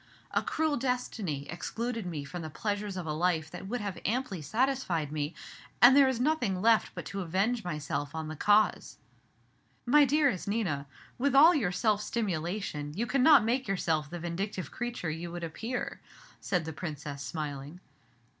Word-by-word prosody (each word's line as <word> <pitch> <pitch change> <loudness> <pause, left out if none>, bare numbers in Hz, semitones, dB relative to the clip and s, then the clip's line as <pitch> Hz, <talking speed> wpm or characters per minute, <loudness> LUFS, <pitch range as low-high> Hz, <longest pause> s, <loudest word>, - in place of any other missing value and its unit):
A - - +2
cruel 315 -2 0
destiny 225 - -2
excluded 225 +5 -4
me 155 -5 -4
from 175 +5 -6
the 160 - -5
pleasures 205 +3 -3
of 180 - -4
a 155 - -2
life 160 -1 0
that 190 - -7
would 240 +3 -2
have 200 -3 -4
amply 225 -6 -1
satisfied 185 - 0
me, 150 +1 -3 0.4
and 245 +4 +8
there 280 -1 +7
is 260 -3 0
nothing 250 -9 +1
left 225 +2 +3
but - - -6
to 195 - -4
avenge 195 +7 0
myself 145 -3 -3
on 160 -1 -3
the 155 - -5
cause." 210 +6 +2 0.9
"My 290 +4 +6
dearest 280 - +2
Nina, 180 -10 -1 0.3
with 275 +1 +2
all 315 +6 +9
your 245 - +1
self 210 +2 +1
stimulation 175 -7 -3
you 225 +5 0
cannot 265 +1 +6
make 250 +2 0
yourself 160 -6 0
the 175 - -5
vindictive 175 0 -4
creature 240 -9 -3
you 170 +2 -5
would 175 0 -6
appear," 225 +10 -4 0.4
said 180 -4 -1
the 160 - -5
Princess, 145 -3 -6
smiling. 145 +1 -5
190 Hz, 165 wpm, -30 LUFS, 160-240 Hz, 0.9 s, all